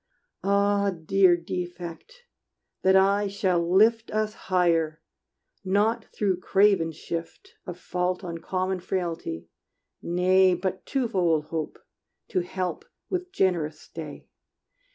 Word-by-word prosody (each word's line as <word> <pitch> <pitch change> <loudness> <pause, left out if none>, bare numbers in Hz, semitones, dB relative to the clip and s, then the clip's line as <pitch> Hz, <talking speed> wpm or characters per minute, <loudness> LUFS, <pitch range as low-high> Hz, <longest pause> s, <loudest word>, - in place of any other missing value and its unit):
Ah, 200 0 +2
dear 180 +1 +3
defect! 175 - -7 0.6
that 190 0 +4
aye 200 +2 +4
shall 190 -3 +1
lift 220 +4 +4
Us 215 0 -1 0.2
higher, 165 -4 +2 0.6
not 210 +4 +1
through 190 -4 -1
craven 195 -4 +3
shift 165 +1 -7
Of 175 -1 -6
fault 180 +1 -2
on 170 -2 -5
common 185 +2 -2
frailty; 170 - -4 0.5
nay, 185 +1 +3
But 185 0 -4
twofold 185 - +1
hope 160 -2 -4 0.5
to 190 - +1
help 185 - -3 0.3
with 365 0 -3
generous 165 - 0
stay! 155 -3 -9
185 Hz, 110 wpm, -26 LUFS, 170-200 Hz, 0.6 s, that